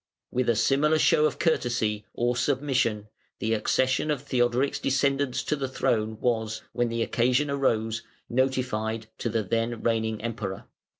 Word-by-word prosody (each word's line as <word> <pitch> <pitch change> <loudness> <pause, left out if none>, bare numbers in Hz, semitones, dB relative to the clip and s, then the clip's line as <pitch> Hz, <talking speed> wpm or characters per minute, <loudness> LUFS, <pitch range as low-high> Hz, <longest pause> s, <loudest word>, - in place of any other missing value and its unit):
With 125 -1 0
a 115 - +4
similar 140 +7 +3
show 155 0 +4
of - - -5
courtesy, 120 - 0
or 120 +1 +1
submission, 125 -5 0 0.3
the 110 +1 -1
accession 130 +6 +1
of 145 -3 -1
Theodoric's 125 0 +1
descendants 135 -1 +1
to 150 - 0
the 135 -2 -3
throne 110 -4 -1
was, 110 -2 -1
when 120 0 0
the 115 0 0
occasion 125 +5 +1
arose, 115 -5 0 0.3
notified 120 -4 -1
to 120 - -1
the 115 -1 0
then 115 +3 -1
reigning 110 -2 0
Emperor. 110 -4 -4
120 Hz, 145 wpm, -27 LUFS, 110-135 Hz, 0.3 s, a